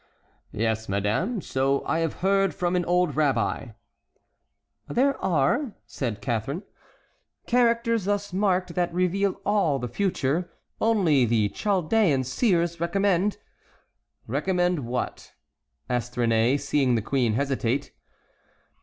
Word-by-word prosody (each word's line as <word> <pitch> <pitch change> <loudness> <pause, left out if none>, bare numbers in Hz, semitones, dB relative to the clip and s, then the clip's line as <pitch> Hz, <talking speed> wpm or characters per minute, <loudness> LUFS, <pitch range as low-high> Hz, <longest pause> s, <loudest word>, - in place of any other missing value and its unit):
"Yes, 110 -1 -1
madame; 115 - 0
so 135 -1 0
I 160 - 0
have 165 -1 -3
heard 195 -1 +2
from 175 0 0
an 180 - +1
old 180 0 +1
rabbi." 140 -5 0 1.2
"There 275 +3 +2
are," 190 - +1
said 115 -6 -4
Catharine, 135 - -2 0.8
"characters 230 -3 +2
thus 205 -1 -1
marked 185 -2 +1
that 175 -1 0
reveal 185 +3 0
all 195 -9 +2
the 125 -2 -4
future. 170 - -1 0.3
Only 180 - +3
the 110 -3 +2
Chaldean 190 - +1
seers 170 - +1
recommend"— 195 +3 +1 0.9
"Recommend—what?" 150 - -2 0.5
asked 120 -1 -2
Réné, 115 +3 +2
seeing 140 -3 +1
the 110 - -1
queen 125 -3 +1
hesitate. 135 0 -1
170 Hz, 110 wpm, -25 LUFS, 130-195 Hz, 1.2 s, Only